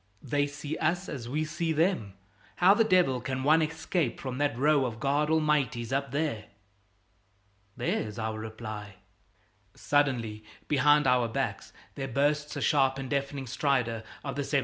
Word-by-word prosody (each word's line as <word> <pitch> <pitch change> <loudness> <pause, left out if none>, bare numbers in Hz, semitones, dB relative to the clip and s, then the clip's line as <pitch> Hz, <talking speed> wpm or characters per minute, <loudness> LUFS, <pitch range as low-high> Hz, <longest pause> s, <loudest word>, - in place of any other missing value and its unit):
"They 145 -1 0
see 145 +2 -6
us 175 +4 0
as 120 -5 -6
we 155 +4 -1
see 165 +1 -2
them. 155 - 0 0.4
How 185 +2 +6
the 225 - +4
devil 180 - +3
can 130 -1 -3
one 155 +3 +5
escape 160 -2 -1
from 130 -1 -5
that 145 -5 0
row 145 +1 +3
of 115 -3 -3
God 145 +4 +1
Almighties 150 -6 +1
up 140 0 0
there?" 140 -6 -2 1.3
There's 105 0 -2
our 110 -1 -3
reply! 110 -2 -7 0.8
Suddenly, 120 -7 0 0.2
behind 145 +1 +4
our 125 -2 +3
backs, 115 - -3 0.2
there 135 -1 -4
bursts 145 +3 0
the - - -3
sharp 135 -2 +3
and 135 0 -6
deafening 140 -1 -2
stridor 125 -3 0 0.2
of 140 -2 -4
the 145 - -1
75's. 140 0 +1
140 Hz, 155 wpm, -29 LUFS, 120-150 Hz, 1.3 s, How